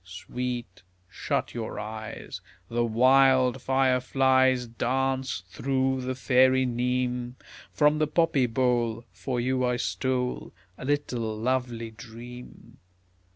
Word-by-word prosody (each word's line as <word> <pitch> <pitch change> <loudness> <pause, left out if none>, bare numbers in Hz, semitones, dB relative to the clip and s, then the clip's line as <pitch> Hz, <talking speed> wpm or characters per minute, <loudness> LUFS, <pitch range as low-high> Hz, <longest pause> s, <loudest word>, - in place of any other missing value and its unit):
Sweet, 95 +4 -5 0.3
shut 90 - -3
your 115 -2 -5
eyes, 110 0 -7 0.3
The 120 0 0
wild 130 +2 +4
fire 130 -1 +2
flies 130 -1 +3
Dance 130 -1 -1
through 130 -1 0
the 130 0 -3
fairy 130 0 +4
neem; 125 0 -1 0.4
From 150 0 +3
the 155 - +2
poppy 155 -4 +2
bole 120 -1 0
For 125 -3 -3
you 130 +1 0
I 125 0 +1
stole 125 0 -2 0.2
A - - -9
little 125 -6 -1
lovely 120 -1 -2
dream. 120 +2 -12
125 Hz, 110 wpm, -27 LUFS, 120-130 Hz, 0.4 s, wild